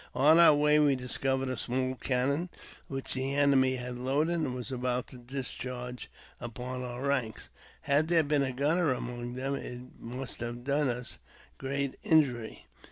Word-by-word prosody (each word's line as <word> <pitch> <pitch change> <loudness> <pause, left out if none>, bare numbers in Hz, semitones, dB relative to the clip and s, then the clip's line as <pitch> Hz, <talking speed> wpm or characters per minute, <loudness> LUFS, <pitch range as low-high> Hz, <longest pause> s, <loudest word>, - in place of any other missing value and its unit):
On 150 +6 +6
our 165 -3 +8
way 150 +1 +4
we 145 -2 +4
discovered 130 +1 -1
a 130 - -1
small 130 +1 -1
cannon 135 +7 0 0.4
which 135 -1 -4
the 130 +1 -1
enemy 135 -2 +4
had 125 -1 -5
loaded 145 +6 +1
and 135 -6 -1
was 125 +1 -5
about 125 -1 -1
to 125 - -11
discharge 125 -1 -5 0.3
upon 125 +2 -5
our 125 +1 -5
ranks. 130 -6 -1 0.3
Had 145 +3 +2
there 165 -1 +4
been 145 -1 +2
a 135 -1 0
gunner 150 +5 +2
among 120 -1 -5
them, 135 +2 -2
it 125 -3 -5 0.2
must 125 +3 -5
have 120 +1 -5
done 140 +1 +1
us 125 0 -4 0.4
great 140 0 -2
injury. 130 -8 +1
130 Hz, 165 wpm, -30 LUFS, 125-140 Hz, 0.4 s, our